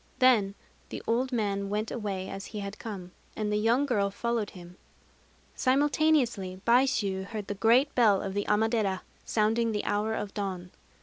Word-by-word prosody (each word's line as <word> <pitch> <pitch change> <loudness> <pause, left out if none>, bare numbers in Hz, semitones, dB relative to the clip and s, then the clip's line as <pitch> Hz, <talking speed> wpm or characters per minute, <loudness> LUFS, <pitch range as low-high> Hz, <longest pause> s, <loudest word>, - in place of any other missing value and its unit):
Then 230 -7 +4 0.3
the - - -6
old 250 +3 0
man 200 -4 -1
went 210 +2 -2
away 195 -5 -3
as 195 0 -6
he 210 -2 -6
had 200 +1 -6
come; 190 -5 -7 0.2
and 210 -1 -2
the - - +2
young 230 +6 +2
girl 205 -7 +1
followed 230 +1 -2
him. 175 +1 -12 0.8
Simultaneously 260 -8 +2
Baishû 230 -6 +2
heard 210 0 -5
the 205 - -3
great 235 +7 +3
bell 215 -5 +4
of 195 - -4
the 205 0 -1
Amadera 210 -3 +1 0.2
sounding 225 +1 +1
the 210 - -2
hour 210 +2 0
of 205 -2 -4
dawn. 185 -3 -4
210 Hz, 165 wpm, -28 LUFS, 195-235 Hz, 0.8 s, Then